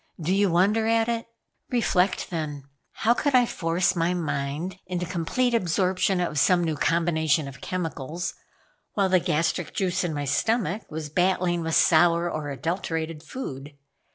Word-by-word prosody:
Do 170 +3 0
you 200 0 +3
wonder 200 +6 +2
at 225 0 +2
it? 230 -1 -2 0.4
Reflect 190 -8 +1
then. 150 -4 -4 0.3
How 230 +3 +2
could 285 +2 0
I 250 -1 +6
force 175 -2 0
my 170 +1 +1
mind 155 +2 -3
into 180 -1 -2
complete 185 +8 0
absorption 185 -1 +1
of 170 -4 -1
some 175 +5 +4
new 160 -2 -1
combination 160 -2 +1
of 135 - -10
chemicals, 170 -1 -4 0.6
while 195 -2 +1
the 185 0 +4
gastric 165 +1 -1
juice 185 -2 0
in 175 - -1
my 145 -1 -3
stomach 215 - 0
was 155 -1 -5
battling 180 0 +1
with 160 0 -1
sour 170 0 +4
or 150 -2 -4
adulterated 160 +2 -3
food? 145 - -7
175 Hz, 155 wpm, -25 LUFS, 160-190 Hz, 0.6 s, I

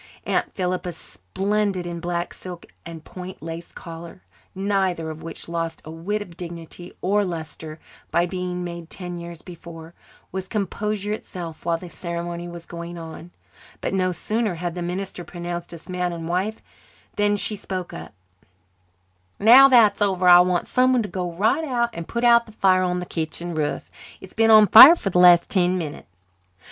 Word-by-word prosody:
Aunt - - 0
Philippa, 180 -1 -2
splendid 195 +2 -2
in 170 -1 -5
black 175 0 -3
silk 180 -2 -9 0.2
and 165 -1 -10
point 185 -3 -9
lace 165 +1 -7
collar, 170 +1 -10 0.3
neither 190 -4 -1
of 155 - -9
which 165 - -8
lost 165 -1 -3
a 155 - -8
whit 200 +6 -3
of 175 -4 -15
dignity 170 0 -9
or 205 +2 +2
lustre 160 -3 -6 0.3
by 170 - +2
being 180 0 -4
made 170 -1 -7
ten 175 -2 -6
years 170 -1 -9
before, 170 -2 -11 0.4
was 190 0 -5
composure 210 +1 -2
itself 170 -7 -8
while 165 -1 +2
the 180 - -10
ceremony 170 +1 -5
was 170 -1 -9
going 170 0 -8
on. 165 +1 -9 0.5
But - - -3
no 185 -1 +1
sooner 215 +3 -2
had 175 0 -4
the 175 - -5
minister 180 +1 -4
pronounced 175 0 -6
us 170 -2 -11
man 180 -1 -2
and 165 -1 -6
wife 190 +6 -2 0.5
than 205 0 +2
she 210 - -2
spoke 185 -3 -6
up. 80 0 -8 1.3
"Now 245 +6 +9
that's 235 -6 +5
over 190 -3 +2
I 175 0 +10
want 180 -1 +2
someone 255 -1 +2
to 205 - -6
go 180 -2 -3
right 210 - +1
out 240 -5 0
and 170 -1 -7
put 235 +1 -3
out 235 -1 +5
the 220 - -14
fire 185 -3 +3
on 180 -1 0
the - - -5
kitchen 170 +1 -4
roof. 150 -2 -3 0.3
It's 190 - -13
been 225 0 +3
on 215 -1 +8
fire 245 - +11
for 195 - -3
the 180 - +2
last 175 -1 +6
ten 185 -1 +2
minutes." 155 -4 -6
180 Hz, 175 wpm, -23 LUFS, 170-200 Hz, 1.3 s, fire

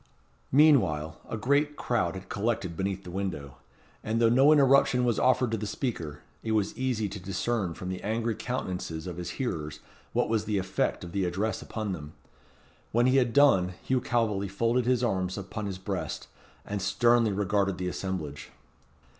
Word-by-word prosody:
Meanwhile, 95 - +4
a - - -3
great 140 +6 +1
crowd 110 -12 0
had 95 - -8
collected 100 -5 -2
beneath 95 +2 -2
the 90 - -8
window, 85 -8 -4 0.5
and 110 +1 -1
though 115 -1 +5
no 135 +5 +6
interruption 135 -3 +5
was 120 -3 +1
offered 125 -2 +3
to 115 - 0
the 105 0 -4
speaker, 85 - -4 0.2
it 110 - -2
was 105 -2 0
easy 125 -5 -1
to 100 +1 -7
discern 95 0 -2
from 90 - -6
the 95 0 -4
angry 115 +2 -1
countenances 90 -9 -4
of 90 -2 -6
his 90 -1 -4
hearers 80 - -3 0.3
what - - +1
was 110 -1 0
the 105 -1 0
effect 90 - -1
of 85 - -7
the 100 0 0
address 95 +4 -1
upon 110 -3 -4
them. 75 -4 -6 0.8
When 120 +2 +3
he 130 +1 +4
had 125 -3 +3
done, 105 -10 +4
Hugh 130 -1 +1
Calveley 105 -5 0
folded 115 +5 +1
his 125 -1 +2
arms 95 -5 0
upon 100 +1 -5
his 95 -2 -4
breast, 95 0 -4 0.4
and 100 -1 -3
sternly 120 +2 +3
regarded 100 -1 0
the 90 - -3
assemblage. 90 -6 -4
105 Hz, 175 wpm, -28 LUFS, 90-120 Hz, 0.8 s, no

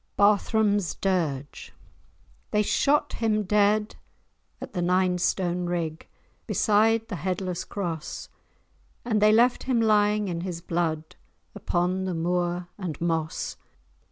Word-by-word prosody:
*BARTHRAM'S 205 -1 +2
DIRGE* 155 -8 -2 0.8
They 210 0 +2
shot 290 +7 +2
him 215 -2 0
dead 210 +2 +2 0.6
at - - -8
the 180 - -2
Nine 180 0 +2
Stone 180 -1 0
Rig, 165 -2 -3 0.4
Beside 225 +1 +2
the 200 - -5
Headless 180 +1 -3
Cross, 170 -6 -5 0.8
And 215 -3 +1
they 210 0 +6
left 240 +3 +4
him 255 -3 +1
lying 210 -1 +3
in 170 -2 -3
his 175 -2 -4
blood, 165 -2 -2 0.4
Upon 180 +2 -1
the 185 -2 -2
moor 175 +1 -1
and 175 -6 -5
moss. 165 -2 -2
185 Hz, 120 wpm, -26 LUFS, 175-210 Hz, 0.8 s, they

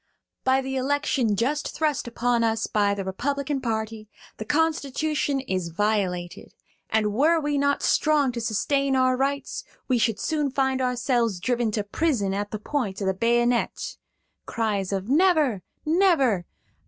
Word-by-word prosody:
"By 260 +1 +3
the 265 0 -3
election 260 -4 +1
just 275 +8 -1
thrust 300 -5 0
upon 240 0 0
us 225 0 +1
by 205 -1 +1
the 200 - -3
Republican 280 +7 -2
party 220 -2 -3 0.3
the 215 - -6
Constitution 295 -1 0
is 185 -9 -2
violated; 180 -2 -2 0.3
and 215 -1 +1
were 315 +8 +3
we 295 -1 -1
not 285 0 +1
strong 300 -4 +3
to 235 -1 -5
sustain 275 +5 0
our 255 0 +3
rights, 275 +1 -2 0.2
we 255 -3 +2
should 225 -2 +1
soon 300 -3 0
find 265 -1 0
ourselves 245 -5 0
driven 240 +3 0
to 210 - 0
prison 205 -3 0
at 205 +1 -2
the 215 - -4
point 210 -3 -3
of 200 - -2
the 190 - +2
bayonet 240 +3 0 0.5
(cries 205 -4 -1
of 195 0 -2
'Never, 300 - +3 0.2
never!') 305 - +3
245 Hz, 150 wpm, -25 LUFS, 215-280 Hz, 0.5 s, By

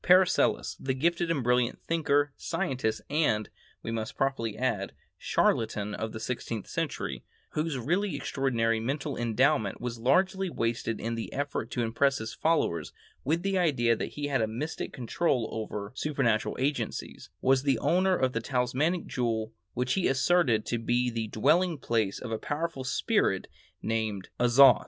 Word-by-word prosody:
Paracelsus, 180 0 +4
the 130 -1 -1
gifted 170 +4 +1
and 150 -6 0
brilliant 125 0 +2
thinker, 145 -3 +1
scientist, 125 -5 -2
and, 145 -9 +1 0.3
we 115 - -3
must 110 -1 -4
probably 115 -6 -1
add, 110 -6 -1 0.2
charlatan 105 -2 +1
of 110 +1 -3
the 110 - -6
sixteenth 115 -2 -4
century, 65 -2 -3 0.3
whose 155 -2 -1
really 175 - 0
extraordinary 115 -5 0
mental 135 +5 -2
endowment 120 -1 +1
was 120 -1 -4
largely 185 +9 +2
wasted 115 -5 -1
in 115 +2 -2
the 115 -1 -4
effort 140 -5 -3
to 120 - -1
impress 135 +4 +2
his 110 0 -5
followers 120 - +1 0.3
with 165 +5 0
the 195 -1 +1
idea 120 -9 +3
that - - -4
he 145 - -3
had 135 -4 +1
a 110 - +2
mystic 130 +9 -4
control 125 -1 0
over 105 -2 -4
supernatural 130 -6 0
agencies, 140 +2 -2
was 130 0 +3
the 135 -3 +2
owner 185 +9 +3
of 130 -2 0
a 115 - 0
talismanic 130 +8 0
jewel 115 -3 -2 0.2
which 125 +1 0
he 190 - +2
asserted 135 -4 +3
to 120 - -1
be 120 +2 +1
the 115 -1 -2
dwelling 155 - +2
place 115 -6 0
of 120 - -6
a 110 - -1
powerful 150 -2 -3
spirit 130 - +1 0.4
named 110 -4 -2
"Azoth." 125 +3 +7
125 Hz, 155 wpm, -29 LUFS, 115-150 Hz, 0.4 s, Azoth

